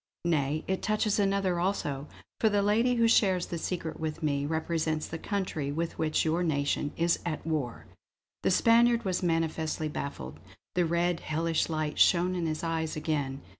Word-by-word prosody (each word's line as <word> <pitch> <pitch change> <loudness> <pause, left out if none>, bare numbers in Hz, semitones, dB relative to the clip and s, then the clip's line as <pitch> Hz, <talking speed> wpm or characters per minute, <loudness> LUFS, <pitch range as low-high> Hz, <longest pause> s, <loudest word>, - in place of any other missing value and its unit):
Nay, 155 -2 +1
it 190 0 -1
touches 215 -1 +1
another 195 -3 +1
also, 150 -7 -1 0.3
for 220 - +4
the 205 -1 +2
lady 230 +5 +3
who 230 -1 +4
shares 190 -5 +3
the 170 - -5
secret 165 -2 -4
with 160 +1 -4
me 140 -1 0
represents 160 0 -1
the 160 - -6
country 185 -9 -2
with 165 +3 -3
which 155 0 +1
your 160 +2 +1
nation 145 -2 0
is 170 0 +2
at 165 -3 -4
war!" 150 -7 -2 0.6
The - - +1
Spaniard 235 +3 +4
was 185 -2 0
manifestly 160 -2 -1
baffled; 105 - -6 0.3
the 175 -2 +2
red, 170 +1 +1
hellish 165 +2 -1
light 155 -2 -2
shone 180 +1 +4
in 175 -2 -1
his 155 0 -3
eyes 165 -1 -1
again. 145 -3 -2
165 Hz, 170 wpm, -29 LUFS, 155-185 Hz, 0.6 s, for